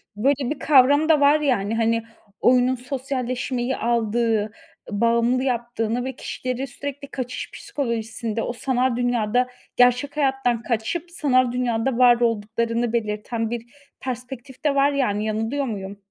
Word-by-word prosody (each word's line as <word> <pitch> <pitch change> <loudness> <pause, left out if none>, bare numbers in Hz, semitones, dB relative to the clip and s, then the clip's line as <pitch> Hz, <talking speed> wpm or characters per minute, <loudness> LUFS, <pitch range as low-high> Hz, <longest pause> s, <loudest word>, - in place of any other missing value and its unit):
böyle 265 +4 +1
bir 300 - -3
kavram 285 +2 +5
da 310 - +6
var, 290 +2 +5
yani. 225 -8 0
Hani, 230 0 +1 0.4
oyunun 250 +1 +4
sosyalleşmeyi 255 -1 -3
aldığı, 225 -2 +1 0.4
bağımlı 235 +4 +2
yaptığını 240 -2 -1
ve 265 -1 -4
kişileri 255 +1 -4
sürekli 280 +2 -7
kaçış 255 -2 -5
psikolojisinde, 230 -3 -3
o 240 - -3
sanal 255 0 0
dünyada 245 0 +1 0.3
gerçek 250 +4 +3
hayattan 265 -5 +1
kaçıp 280 +10 -2
sanal 255 -6 +2
dünyada 245 0 0
var 245 -1 +6
olduklarını 230 +1 0
belirten 225 0 -2
bir 235 -1 -4 0.3
perspektif 255 0 -7
de 295 -2 +2
var, 280 +1 +4
yani. 215 -7 0
Yanılıyor 225 +6 -1
muyum? 200 -4 -5
245 Hz, 130 wpm, -23 LUFS, 230-265 Hz, 0.4 s, da